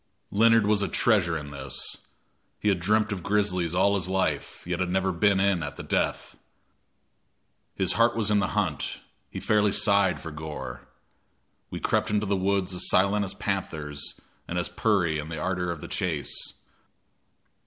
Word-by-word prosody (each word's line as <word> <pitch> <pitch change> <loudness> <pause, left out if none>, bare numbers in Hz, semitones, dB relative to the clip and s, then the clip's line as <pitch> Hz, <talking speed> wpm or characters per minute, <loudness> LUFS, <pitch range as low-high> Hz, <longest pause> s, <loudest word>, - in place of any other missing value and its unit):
Leonard 115 +1 +5
was 105 0 +3
a 100 - +1
treasure 95 -8 +2
in 75 -2 -8
this. 70 -2 -3 0.6
He 105 - +1
had 95 -3 +2
dreamt 110 +4 +2
of 100 -3 -3
grizzlies 90 -4 0
all 100 +2 +4
his 95 -2 0
life, 95 0 -2
yet 90 0 -2
had 90 -1 0
never 95 +1 +1
been 100 +2 +2
in 95 -3 +2
at 75 -1 -5
the - - -7
death. - - -2 1.4
His 95 -2 +2
heart 115 +1 +3
was 110 -2 +1
in 105 - +4
the 95 - +1
hunt 90 -9 -1 0.3
he - - -6
fairly 105 -1 +2
sighed 100 -2 +3
for 80 - -7
gore. 75 0 -7 0.8
We - - -5
crept - - 0
into 105 0 +1
the 100 0 +1
woods 95 0 0
as 90 - 0
silent 100 +2 +3
as 95 - -4
panthers 80 -7 -3 0.3
and 90 - -3
as 90 - 0
"purry" 90 -8 +1
in 75 +1 -6
the 80 - -5
ardor 90 +1 -1
of 80 -3 -6
the - - -7
chase. 80 -6 -2
95 Hz, 175 wpm, -26 LUFS, 85-105 Hz, 1.4 s, Leonard